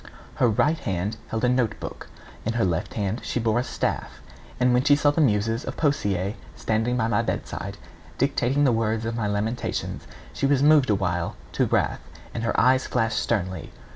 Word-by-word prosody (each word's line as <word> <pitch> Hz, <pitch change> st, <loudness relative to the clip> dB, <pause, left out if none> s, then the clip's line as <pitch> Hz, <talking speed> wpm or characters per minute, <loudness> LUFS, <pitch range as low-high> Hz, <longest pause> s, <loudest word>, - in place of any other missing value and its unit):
[B] -, -, -16 dB, 0.3 s
Her 125 Hz, -, +4 dB
right 150 Hz, +9 st, +2 dB
hand 100 Hz, +4 st, -2 dB
held 110 Hz, 0 st, -3 dB
a -, -, +4 dB
note 125 Hz, -4 st, +1 dB
book; -, -, -7 dB, 0.4 s
in 110 Hz, -, -1 dB
her 115 Hz, -2 st, +2 dB
left 85 Hz, -2 st, -2 dB, 0.3 s
she 120 Hz, -, -2 dB
bore 115 Hz, 0 st, +2 dB
a -, -, 0 dB
staff. 65 Hz, -, -3 dB, 0.4 s
And 125 Hz, 0 st, +4 dB
when 125 Hz, +1 st, +3 dB
she 145 Hz, 0 st, +6 dB
saw 145 Hz, 0 st, +3 dB
the 160 Hz, -, +1 dB
Muses 115 Hz, -1 st, +2 dB
of -, -, -6 dB
Poesie 100 Hz, -, 0 dB, 0.2 s
standing 115 Hz, +3 st, 0 dB
by 120 Hz, -3 st, +1 dB
my 115 Hz, -, +2 dB
bedside, -, -, -4 dB, 0.4 s
dictating 135 Hz, +1 st, +1 dB
the 135 Hz, -, +5 dB
words 115 Hz, -1 st, 0 dB
of 115 Hz, 0 st, -2 dB
my 110 Hz, -3 st, -1 dB
lamentations, 105 Hz, +4 st, -2 dB, 0.3 s
she 140 Hz, -, 0 dB
was 140 Hz, -1 st, +3 dB
moved 150 Hz, -4 st, +5 dB
awhile 90 Hz, -4 st, 0 dB, 0.2 s
to -, -, +1 dB
wrath, -, -, +1 dB, 0.3 s
and 115 Hz, -, -3 dB
her 115 Hz, -, +1 dB
eyes 130 Hz, +2 st, +4 dB
flashed 115 Hz, -3 st, +1 dB
sternly. 95 Hz, -6 st, -2 dB
115 Hz, 190 wpm, -25 LUFS, 105-130 Hz, 0.4 s, she